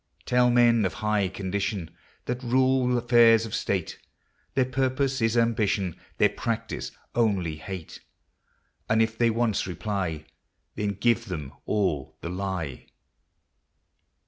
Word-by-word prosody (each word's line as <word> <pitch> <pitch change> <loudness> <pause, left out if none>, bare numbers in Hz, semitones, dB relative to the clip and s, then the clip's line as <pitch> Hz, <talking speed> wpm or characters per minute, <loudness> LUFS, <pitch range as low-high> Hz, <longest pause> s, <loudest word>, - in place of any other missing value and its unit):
Tell 125 0 +4
men 120 -2 +5
of 95 -4 -1
high 105 -2 +1
condition, 95 -2 -3 0.3
That 125 +1 -3
rule 130 0 +2
affairs 115 -2 +5
of 110 - -8
state, 95 -5 -2 0.6
Their 130 -1 +3
purpose 130 +1 0
is 115 +1 +2
ambition, 105 -6 +1 0.2
Their - - +5
practice 115 -2 -3 0.2
only 100 -9 +1
hate; 90 +1 -8 0.9
And 110 - +3
if 110 0 -2
they 115 +1 +3
once 115 -3 0
reply, 90 -5 -3 0.5
Then 105 -1 -2
give 120 +1 +1
them 75 - -6
all 95 -10 -1
the 85 - -5
lye. 90 -7 -4
110 Hz, 120 wpm, -26 LUFS, 95-120 Hz, 0.9 s, men